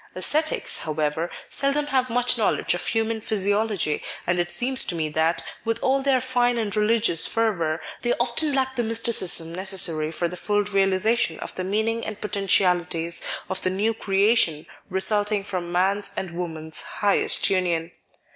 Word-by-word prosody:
Ascetics, 310 +12 -1
however, 155 +2 -2 0.2
seldom 280 +2 0
have 260 -3 0
much 245 +1 +2
knowledge 225 -3 +1
of 175 - -3
human 225 0 0
physiology, 205 -5 0 0.2
and 175 0 +1
it 175 0 0
seems 250 +9 0
to 175 - -3
me 155 -2 -1
that, 160 +2 0 0.2
with 225 0 -1
all 270 +1 +2
their 270 -1 +2
fine 245 -1 +1
and 215 -3 -1
re 210 - +2
ligious 220 -7 +3
fervour, 175 -9 0 0.2
they 240 - 0
often 245 +6 +1
lack 265 -1 0
the 245 - 0
mysticism 220 -7 0
neces 190 +1 0
sary 155 -4 +1
for 170 +2 -1
the 175 - -7
full 205 +3 0
realisation 195 -1 +1
of - - -6
the 185 - -4
meaning 220 +4 -1
and 215 -1 -5
poten 200 -2 -3
tialities 175 -3 +2 0.3
of 190 - -1
the 185 - +5
new 205 +5 0
creation 195 -6 +2 0.2
resulting 205 +2 +1
from 180 -3 -4
man's 195 +3 +1
and 190 -2 -3
woman's 160 -2 -3
highest 205 -1 +2
union. 175 -3 0
200 Hz, 165 wpm, -24 LUFS, 175-230 Hz, 0.3 s, the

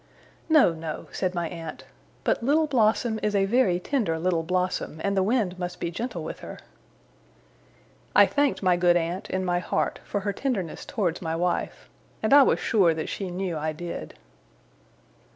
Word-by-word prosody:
'No, 305 - +6
no,' 160 -1 -6
said 185 -1 -2
my 170 -1 -1
aunt. 165 -2 -7 0.4
'But - - +1
Little 295 +6 +3
Blossom 225 -4 +2
is 210 -1 0
a 195 -1 +3
very 195 -5 +2
tender 200 - -1
little 170 0 +1
blossom, 180 -2 -2
and 200 0 0
the 190 - +3
wind 195 -3 0
must 180 0 -4
be 170 - -2
gentle 235 +8 -4
with - - -6
her.' - - -9 1.6
I - - +8
thanked 285 -6 0
my 180 -2 +4
good 175 0 +4
aunt, 175 +3 -3
in 185 0 -1
my 175 -1 +1
heart, - - -1
for 205 - -3
her 200 +1 -2
tenderness 200 - -3
towards 180 -7 -1
my 165 -2 -2
wife; 175 +1 -2 0.4
and 220 - +3
I 285 - +10
was - - +3
sure 185 -7 +3
that 155 - -4
she 195 -2 -4
knew 180 -1 -3
I 155 0 -2
did. 170 +2 -7
185 Hz, 175 wpm, -26 LUFS, 175-215 Hz, 1.6 s, I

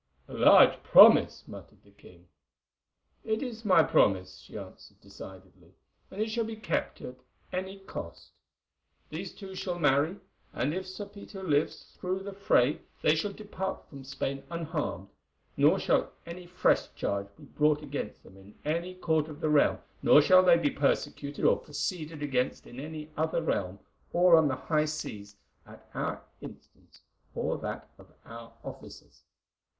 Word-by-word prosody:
"A - - -12
large - - +6
promise," - - +7
muttered - - -12
the 100 - -22
king. 90 -3 -19 1.0
"It 220 +3 -1
is 230 -3 -7
my 185 -6 +5
promise," 95 -7 +2
she - - -11
answered - - -12
decidedly, 95 -1 -14 0.3
"and 190 - -10
it 220 +1 0
shall 230 +1 0
be 225 0 -5
kept 215 - -3
at 125 - -8 0.4
any 190 +2 -4
cost. 195 - -9 0.8
These - - -6
two 195 -2 -9
shall 180 -1 -4
marry, 145 +2 +2 0.4
and 135 +5 -1
if 190 +1 -4
Sir 190 +2 -7
Peter 200 -1 -11
lives 150 -4 0 0.2
through 185 +1 -2
the 200 0 -7
fray 150 -8 +2 0.2
they 155 - +5
shall 180 +6 -1
depart 195 -2 -6
from 140 -2 -11
Spain 135 0 -4
unharmed, 160 - -4 0.5
nor - - +4
shall - - +1
any 175 +1 -9
fresh 180 +1 +1
charge 100 0 -2
be - - -16
brought 150 0 +1
against 140 -7 -6
them 95 - -16
in 95 +2 -16
any 170 +4 -2
court 160 -4 0
of 155 -1 -10
the 155 -2 -1
realm, 150 -1 +4 0.2
nor - - +7
shall 185 +5 +6
they 180 -2 +6
be 150 -4 0
persecuted 140 0 -1
or - - +4
proceeded 150 +1 -5
against 130 -3 -1
in 120 - -11
any 155 +1 -7
other 160 +1 -1
realm 100 - -2 0.4
or 175 0 +6
on 160 -2 +5
the 130 - -1
high 150 +4 0
seas 105 -9 -6 0.3
at - - -15
our - - -3 0.2
instance - - -14 0.3
or - - -2
that - - -6
of - - -17
our 115 0 -11
officers. - - -11
155 Hz, 160 wpm, -29 LUFS, 135-185 Hz, 1.0 s, promise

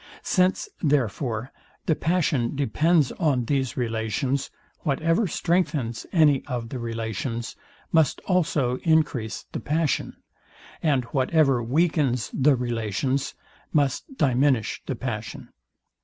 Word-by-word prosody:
Since 185 0 +2
therefore 125 - 0 0.3
the 170 - +3
passion 150 -9 0
depends 145 +3 +2
on 140 -8 0
these 135 0 -1
relations, 120 +3 -1 0.3
whatever 165 +7 +1
strengthens 155 -10 -1
any 150 -6 +4
of 120 -2 -4
the 130 - -5
relations 115 +1 -4 0.4
must 160 -4 +3
also 150 -9 +1
encrease 150 -9 +1
the - - -3
passion, 155 0 -1 0.7
and 140 -5 +2
whatever 135 -2 +3
weakens 135 -1 +1
the 140 +1 +4
relations 120 +2 -1 0.4
must 150 - 0
diminish 130 -4 +2
the - - -2
passion. - - -5
135 Hz, 105 wpm, -25 LUFS, 120-160 Hz, 0.7 s, any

